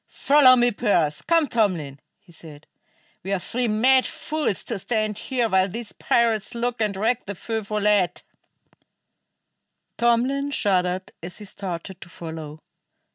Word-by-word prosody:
"Follow 275 -3 +5
me, 245 -1 +3
Pearse; 175 -10 0
come 330 -2 +2
Tomlin!" 180 - -1 0.2
he - - -22
said. 155 -3 -13 0.6
"We 195 - -6
are - - +2
three 245 +7 -2
mad 255 +5 +4
fools 300 - -3
to 225 -4 -3
stand 215 0 -2
here 250 -3 -1
while 190 -2 +2
these 230 +3 -6
pirates 230 0 0
loot 240 +1 -1
and 210 -3 -1
wreck 225 +3 0
the 200 - -5
Feu 225 +4 -3
Follette!" 205 -3 0 1.8
Tomlin 250 +4 +2
shuddered 185 -7 0
as 175 +1 -7
he 210 - -9
started 190 -1 -6
to 175 - -11
follow. 160 -3 -8
210 Hz, 140 wpm, -23 LUFS, 180-240 Hz, 1.8 s, Follow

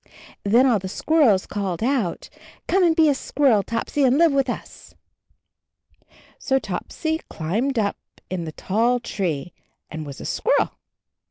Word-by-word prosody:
Then 230 +6 +4
all 240 -5 +3
the 190 - -6
squirrels 245 - +3
called 195 -2 -3
out, 240 -8 -1 0.4
"Come 380 0 +3
and 335 -2 +4
be 320 -1 +5
a 290 - +4
squirrel, 265 -5 +2
Topsy, 230 +7 -2
and 260 +1 +4
live 335 -1 +5
with 275 -1 +1
usl" 245 - -7 1.4
So 265 - +1
Topsy 315 - -3
climbed 225 - -2
up 205 -2 0 0.3
in 180 -2 -4
the 160 - -5
tall 230 +9 +1
tree 175 -8 -3 0.4
and 160 0 -5
was 140 -3 -9
a - - -8
squirrel. - - +1
230 Hz, 150 wpm, -23 LUFS, 185-275 Hz, 1.4 s, be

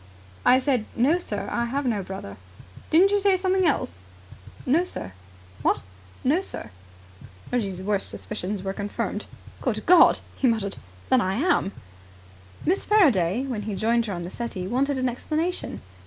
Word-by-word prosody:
"I 255 - +6
said, 260 -4 +1
'No, 285 +9 +3
sir, - - -4
I 235 - 0
have 275 +4 -2
no 220 -5 0
brother'." 185 - -7 0.5
"Didn't 370 +5 +5
you 410 - +3
say 390 -1 +3
something 375 -1 +2
else?" 90 - -1 0.7
"No, 305 +7 +3
sir." 95 - -5 0.5
"What?" - - +2 0.4
"No, 305 +8 +3
sir." 110 - -6 0.8
Reggie's 195 -7 -1
worst 200 0 +1
suspicions 205 -2 -4
were 195 0 -2
confirmed. 205 0 -3 0.3
"Good 215 -4 -1
God!" 355 -1 +7 0.2
he 265 - +1
muttered. 215 -4 0 0.3
"Then 260 -1 +5
I 190 -1 0
am!" 295 - +2 0.9
Miss 370 +5 +1
Faraday, 250 - +3
when 245 -6 -3
he 210 -1 -4
joined 230 +3 +1
her 200 - -3
on 175 -1 -4
the 175 - -6
settee, 225 -6 -4
wanted 265 +7 0
an 255 0 +1
explanation. 310 +8 -2
240 Hz, 155 wpm, -25 LUFS, 200-310 Hz, 0.9 s, God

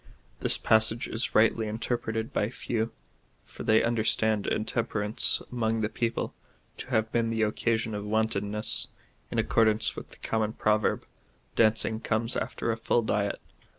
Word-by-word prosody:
This - - +3
passage 110 +2 +4
is 115 - -3
rightly 110 0 +4
interiJreted 115 +2 -3
by 105 - 0
few, 115 -2 -2 0.5
for - - -12
they 110 0 +4
understand 110 -2 +1
intemperance 110 -1 0
among 115 -2 0
the 105 - 0
people 115 0 -2 0.4
to - - -7
have 110 -3 0
been 115 -1 +1
the 110 -1 0
occasion 110 +1 0
of 105 0 -4
wantonness/ 105 -1 0 0.4
in - - -4
accordance 110 -1 +2
with - - -8
the - - -14
common 110 -1 -1
proverb, 105 -1 +1 0.3
" - - -38
Dancing 110 0 +3
comes 115 +2 -1
after 115 - -2
a 115 - -2
full 115 +1 +1
diet." 100 -2 -1
110 Hz, 150 wpm, -28 LUFS, 110-115 Hz, 0.5 s, passage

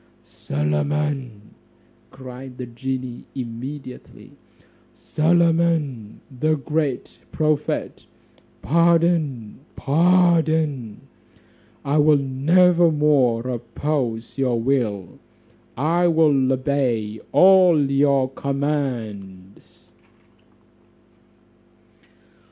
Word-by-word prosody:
"Solomon," 115 - -3 0.6
cried 130 -1 -11
the 125 - -6
genie 125 +1 -6
immediately, 130 +2 -8 0.6
"Solomon, 160 -8 0 0.2
the 155 +2 +1
great 150 -2 -3
prophet, 155 -1 -2 0.6
pardon, 165 -8 +1 0.2
pardon; 160 - +1 0.8
I 145 +2 +1
will 150 0 +5
never 165 +6 +3
more 135 -6 +1
oppose 120 0 -4
your 125 -3 0
will, 115 -7 -2 0.6
I 170 +6 +1
will 150 -5 +2
obey 125 -5 -1
all 185 -3 +5
your 140 -1 +2
commands." 120 -10 -5
140 Hz, 65 wpm, -21 LUFS, 120-155 Hz, 0.8 s, will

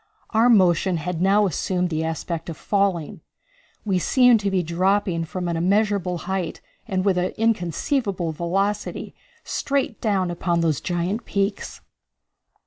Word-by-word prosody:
Our 230 +2 +4
motion 185 -4 +4
had 165 +1 -3
now 200 +2 +4
assumed 180 0 -1
the 160 0 -1
aspect 165 +1 -4
of 160 - -6
falling. 195 -1 -1 0.6
We 190 -3 +1
seemed 245 +3 +5
to 200 -1 -1
be 190 -2 +1
dropping 180 0 +1
from 180 +2 -4
an 170 - -1
immeasurable 190 0 +1
height 190 -2 -3 0.3
and 190 -3 -1
with 190 -3 +2
an 180 - -1
inconceivable 200 - 0
velocity, 195 +6 -2 0.3
straight 275 -5 -2
down 195 -5 +1
upon 170 0 0
those 160 -4 0
giant 180 +6 -2
peaks. 200 0 -2
185 Hz, 135 wpm, -23 LUFS, 170-205 Hz, 0.6 s, seemed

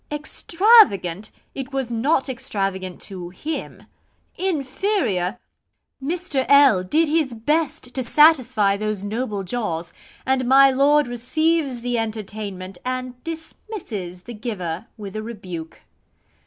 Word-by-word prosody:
Extravagant! 295 - +3 0.2
it 270 0 -6
was 265 -3 -2
not 265 +5 +1
extravagant 195 -8 -3
to 180 -3 -6
HIM; 300 - -6 0.5
Inferior! 280 - -1 0.7
Mr. 320 -3 -1
L 280 -9 +7
did 310 - +2
his 295 -5 +1
best 265 +1 -1
to 260 - -1
satisfy 255 -7 +4
those 215 -1 -2
noble 210 -1 -3
jaws, 175 -5 -3 0.3
and 260 -1 +1
my 270 +1 +7
lord 285 +3 +4
receives 270 +2 0
the 245 -1 -1
entertainment, 205 -4 -5
and 255 -1 -4
dismisses 320 - -7
the 240 - -8
giver 210 -4 -5
with 200 -2 -8
a 215 - -2
rebuke. 185 -8 -8
245 Hz, 115 wpm, -22 LUFS, 200-290 Hz, 0.7 s, L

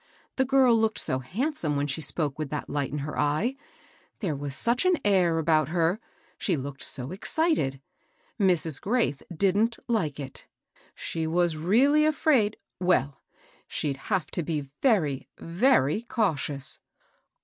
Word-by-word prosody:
The 265 - +3
girl 260 -2 +5
looked 220 -1 +1
so 130 - -1
handsome 175 - -2
when 140 0 0
she 145 +2 -3
spoke 150 -1 -1
with 155 -2 -3
that 150 0 -4
light 145 -2 -1
in 150 - -3
her 150 - -5
eyel 150 - +1 0.3
— - - -32
there 180 -9 -1
was 140 -1 -5
such 235 +8 +3
an 370 -1 +4
air 180 -5 +3
about 155 -2 +2
her 170 +4 +1
I - - -33
— - - -34
she 180 -6 0
looked 140 0 -6
so 130 +2 -5
excited 190 - 0 0.6
I - - +1
Mrs. 165 -5 +1
Graith 215 - 0
didnH 200 +6 +2
like 175 - 0
it. 135 -2 -8 0.5
She 160 -1 -3
was 170 0 +1
really 245 - +4
afraid, 280 -8 +2
— - - -61
well, 140 -4 +2 0.5
she'd 140 -2 -2
have 190 -6 0
to - - -1
be 150 -4 -3
very, 160 - +2
very 175 - +2
cautious. 155 - -1
170 Hz, 160 wpm, -27 LUFS, 145-225 Hz, 0.6 s, girl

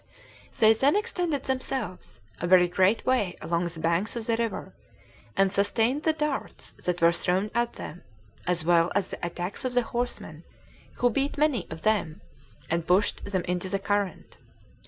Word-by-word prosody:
They 220 -1 +6
then 270 - +3
extended 360 - 0
themselves 260 -6 -4 0.2
a 175 - -2
very 180 0 +6
great 190 +4 +2
way 210 -9 +1
along 170 +2 -1
the 170 -1 -8
banks 170 +8 0
of 230 -2 -4
the 230 - +1
river, 230 -1 -3 0.6
and 195 -1 +4
sustained 225 +7 +1
the 320 - +3
darts 300 -2 -3
that 175 -1 -1
were 170 - +7
thrown 185 +4 0
at 235 0 0
them, 170 - -8 0.5
as 175 -3 +1
well 170 0 +4
as 200 -2 0
the - - -7
attacks 175 +5 -4
of 255 -1 -2
the 245 - +4
horsemen, 235 - -4 0.5
who 245 0 +2
beat 275 +5 -1
many 280 - +1
of 160 0 -8
them, 205 -7 0 0.5
and 170 0 -1
pushed 190 +3 +2
them 190 -3 -1
into 180 +2 -2
the 195 - 0
current. 200 -1 -2
200 Hz, 170 wpm, -27 LUFS, 175-245 Hz, 0.6 s, were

